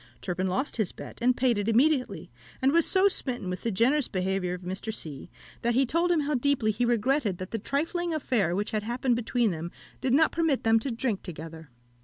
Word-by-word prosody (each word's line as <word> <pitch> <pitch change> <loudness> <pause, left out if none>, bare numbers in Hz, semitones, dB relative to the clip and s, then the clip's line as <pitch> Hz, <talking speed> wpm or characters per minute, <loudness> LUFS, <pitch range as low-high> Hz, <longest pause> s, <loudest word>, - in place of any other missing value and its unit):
Turpin 185 0 -2
lost 255 +11 -2
his 215 -6 0
bet - - -10
and 250 +1 +3
paid 245 -4 +2
it 205 +2 -1
immediately, 260 +3 +1 0.3
and 265 0 +3
was 335 +1 +4
so 385 +1 +5
smitten 245 - -2
with 180 - -5
the 235 - -1
generous 245 +8 +2
behaviour 185 -1 -1
of 180 - -11
Mr. 190 +5 -4
C., 155 -10 -5 0.3
that 235 0 +1
he 265 +2 +4
told 335 +7 +1
him 330 -3 +3
how 295 +1 -1
deeply 255 -4 +1
he 220 +4 0
regretted 240 -3 +1
that 185 +1 -7
the 225 - -2
trifling 330 - -2
affair 230 - 0
which 205 +2 -2
had 215 - -1
happened 240 +3 0
between 235 -1 0
them 165 0 -5 0.3
did 260 -1 +2
not 315 +2 +4
permit 325 -5 0
them 225 0 +4
to 245 - -4
drink 230 -4 -2
together. 160 -3 -9
235 Hz, 215 wpm, -27 LUFS, 190-275 Hz, 0.3 s, so